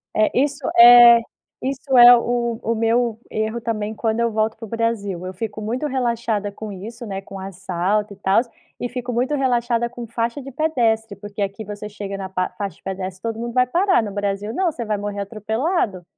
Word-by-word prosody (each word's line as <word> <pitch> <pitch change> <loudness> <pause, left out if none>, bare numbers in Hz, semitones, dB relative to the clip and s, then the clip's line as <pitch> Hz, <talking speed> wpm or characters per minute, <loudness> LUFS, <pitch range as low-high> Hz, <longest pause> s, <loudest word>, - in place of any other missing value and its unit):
É, 215 0 +3
isso 285 0 0 0.2
é 240 0 +9 0.4
isso 265 0 -1
é 245 0 +10
o 235 -1 -1
o 230 - -1
meu 230 0 +1
erro, 220 +2 -2
também, 220 -1 -3
quando 220 +1 -1
eu 235 0 +1
volto 220 0 0
para 225 - -8
o - - -11
Brasil. 205 -5 -2
Eu 185 - -5
fico 215 +2 -5
muito 240 +8 -2
relaxada 235 -6 -1
com 210 +1 -8
isso, 225 +6 -8
né, 195 -2 -5
com 195 0 -10
assalto 195 +2 -2
e - - -16
tal, 195 +2 +3 0.4
e 245 - -3
fico 245 0 -5
muito 250 +5 0
relaxada 240 -3 0
com 240 0 -8
faixa 235 +4 -3
de 275 +1 -9
pedestre 230 -8 0
porque 205 +1 -8
aqui, 200 +2 -3
você 210 0 -7
chega 200 -1 -6
na 195 -1 -5
pa 185 -1 -1
faixa 200 -2 -4
de - - -29
pedestre, 190 -1 -5
todo 225 -1 -4
mundo 235 0 -4
vai 250 0 +4
parar, 355 - +2
no 210 - -5
Brasil 205 +1 -3
não, 360 +3 +1
você 250 - -5
vai 210 -1 -1
morrer 205 0 -4
atropelado. 220 - -2
225 Hz, 205 wpm, -21 LUFS, 205-240 Hz, 0.4 s, é